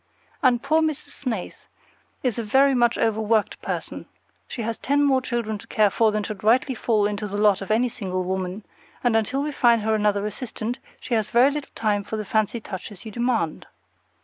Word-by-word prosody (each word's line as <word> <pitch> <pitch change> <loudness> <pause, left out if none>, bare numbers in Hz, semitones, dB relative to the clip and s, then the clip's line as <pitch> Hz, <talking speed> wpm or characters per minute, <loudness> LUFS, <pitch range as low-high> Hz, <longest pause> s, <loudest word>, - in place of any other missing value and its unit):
And 250 -3 +3
poor 315 +1 +3
Miss 310 -3 +1
Snaith 235 -10 -5 0.6
is 245 -4 0
a - - -2
very 270 +6 +4
much 240 -2 +3
overworked 220 -1 +1
person. - - -5 0.4
She 235 - -5
has 230 +1 -2
ten 285 +1 +2
more 270 -2 +3
children 235 -4 -2
to 230 - -14
care 210 -3 +3
for 225 +1 +3
than 210 0 -1
should 210 -1 -6
rightly 255 +6 +3
fall 220 -3 +1
into 210 0 -2
the 205 0 -4
lot 205 -2 +3
of 195 - -6
any 230 +4 +3
single 185 -5 -3
woman, 185 +2 -3 0.4
and 240 -2 +2
until 250 +6 +1
we 300 - -2
find 235 -5 +3
her 220 +1 +1
another 205 -1 +1
assistant, 230 +2 -4 0.2
she - - -5
has 220 -2 +1
very 250 +4 +5
little 290 -1 -5
time 205 -2 0
for 220 - -5
the 215 - -4
fancy 215 +2 0
touches 205 0 -8
you 220 - -6
demand. 235 -8 -1
220 Hz, 200 wpm, -24 LUFS, 210-245 Hz, 0.6 s, very